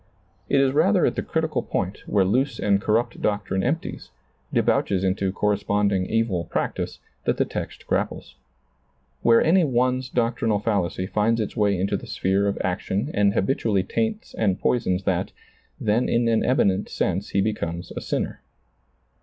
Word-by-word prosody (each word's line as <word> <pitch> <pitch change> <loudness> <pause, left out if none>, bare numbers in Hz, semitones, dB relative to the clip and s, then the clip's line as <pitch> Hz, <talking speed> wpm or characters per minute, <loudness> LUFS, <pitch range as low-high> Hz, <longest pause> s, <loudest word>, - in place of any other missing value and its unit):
It 140 - +4
is 135 -1 +3
rather 175 +6 +3
at - - +2
the - - -2
critical 160 -1 -1
point 95 +2 -3
where 100 -2 +3
loose 125 +5 +1
and 100 -1 +2
corrupt 110 +3 0
doctrine 100 -2 0
empties, 150 - -3 0.4
debouches 95 -2 +1
into 95 0 0
corresponding 100 -1 +1
evil 110 -6 0
practice, - - -3 0.3
that - - +1
the - - +2
text - - -6
grapples. - - -2 0.9
Where 115 -1 +5
any 175 +3 +4
one's 130 -2 +1
doctrinal 115 -3 +1
fallacy 100 -4 -1
finds 110 +4 +1
its 105 - -3
way 100 -4 +2
into 95 +2 0
the - - -10
sphere 95 +2 +1
of 100 - -1
action 95 +7 -2
and 100 0 +2
habitually 100 -3 +1
taints 220 - -2
and 100 -4 0
poisons 95 -6 +1
that, - - -1 0.5
then 110 +3 +1
in 120 0 +2
an 115 -1 +2
eminent 100 -6 +2
sense 95 +2 -1
he 100 - +1
becomes 85 -5 -3
a - - -4
sinner. - - -3
105 Hz, 155 wpm, -24 LUFS, 95-120 Hz, 0.9 s, Where